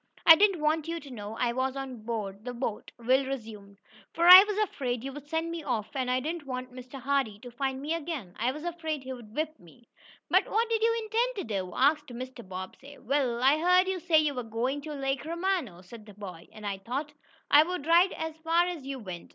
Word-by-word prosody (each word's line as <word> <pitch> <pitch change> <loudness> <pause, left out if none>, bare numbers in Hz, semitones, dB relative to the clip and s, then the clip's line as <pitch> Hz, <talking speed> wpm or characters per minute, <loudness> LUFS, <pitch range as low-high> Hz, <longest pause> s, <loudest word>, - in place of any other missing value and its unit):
"I 325 - +11
didn't 390 -3 +3
want 310 +1 +1
you 335 0 -3
to 280 -3 -12
know 215 -2 -7
I 240 -1 0
was 260 +1 -1
on 265 -4 -6
board 215 -3 -5
the 250 0 -6
boat," 235 -3 -4
Will 255 +3 +2
resumed, 215 -7 -7 0.4
"for 340 +1 +2
I 365 +2 +13
was 415 -1 -3
afraid 255 - -1
you'd 275 +2 -7
send 325 +2 -2
me 335 -1 -4
off, 240 -6 -3
and 260 -2 -1
I 255 0 +2
didn't 310 +2 -5
want 255 -1 -5
Mr. 255 +2 -9
Hardee 265 -5 0
to 245 - -10
find 265 +2 -2
me 295 +4 -2
again. 305 - -5
I 240 +3 +1
was 300 +3 -8
afraid 320 -4 -4
he'd 245 -4 -9
whip 310 0 -3
me." 180 +8 -19 0.4
"But - - +3
what 455 +2 +1
did 450 -1 +1
you 460 0 +2
intend 470 +3 0
to 390 - -3
do?" 185 -2 -3
asked 295 +2 +3
Mr. 255 0 -8
Bobbsey. 185 +10 -9
"Well, 255 -2 -1
I 280 +4 +5
heard 360 +2 +4
you 380 -1 -1
say 335 -2 +3
you 305 -2 +3
were 250 - -3
going 240 +5 -2
to 305 +1 -7
Lake 270 -1 -2
Romano," 335 - -2
said 215 +3 -13
the 205 - -13
boy, 185 -5 -9
"and 215 -1 -11
I 200 -1 -3
thought 275 +9 -4 0.4
I 290 - +9
would 340 -2 -2
ride 345 +3 +5
as 320 -1 -5
far 330 +2 +2
as 350 -5 -5
you 275 -1 -4
went. 185 -8 -8
270 Hz, 225 wpm, -28 LUFS, 235-325 Hz, 0.4 s, I